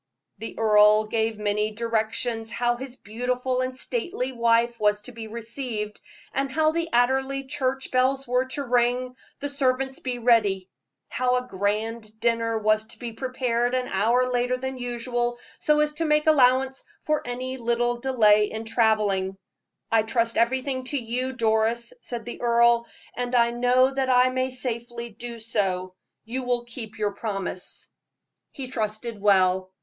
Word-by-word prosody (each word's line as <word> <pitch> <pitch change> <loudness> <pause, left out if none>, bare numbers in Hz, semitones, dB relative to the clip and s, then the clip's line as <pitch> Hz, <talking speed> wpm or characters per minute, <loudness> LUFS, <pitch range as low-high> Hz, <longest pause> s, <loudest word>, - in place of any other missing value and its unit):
The 225 - -7
earl 215 -1 +5
gave 220 0 -1
many 210 0 0
directions 225 +1 -1
how 240 0 0
his 260 +1 -8
beautiful 250 +3 -2
and 255 0 -3
stately 350 - -3
wife 235 -1 +2
was 210 0 +2
to 250 - -9
be 225 -2 -8
received; 225 -1 -5 0.3
how 285 +3 +1
the 330 0 -2
Anderley 265 +3 +2
church 265 -1 -2
bells 260 +1 +2
were 250 +1 +2
to 270 +2 -4
ring, 250 0 +1 0.3
the 285 - -1
servants 265 -1 0
be 250 -2 -3
ready; 210 -6 +2 0.4
how 250 0 +1
a 250 0 -1
grand 215 +2 -2
dinner 230 -1 +1
was 215 0 +2
to 230 - -11
be 235 -2 -6
prepared 245 0 -1
an 255 -1 -1
hour 235 +6 +2
later 250 +1 +1
than 265 0 -5
usual, 240 0 -2 0.2
so 300 0 +3
as 300 0 +1
to 325 +2 -2
make 300 0 +2
allowance 265 -3 +4 0.2
for 305 -1 +1
any 255 +2 -4
little 240 0 0
delay 215 -5 +4
in 220 +1 -5
traveling. 215 -4 +1 0.5
"I 225 -1 +5
trust 230 +1 0
everything 260 +3 +1
to 285 +3 -2
you, 250 +1 -2
Doris," 230 - +1
said 235 -2 -6
the 240 - -7
earl, 235 0 +4 0.3
"and 245 0 -2
I 235 -1 +4
know 250 +2 +3
that 270 -1 0
I 255 0 +5
may 255 0 0
safely 240 -2 -4
do 235 +2 -7
so; 195 -5 -1 0.3
you 250 +4 -3
will 245 -1 -1
keep 230 -2 -8
your 210 -1 0
promise." 195 -3 -4 0.6
He 270 - -6
trusted 220 -2 -3
well. 190 -2 +3
240 Hz, 155 wpm, -25 LUFS, 220-255 Hz, 0.6 s, earl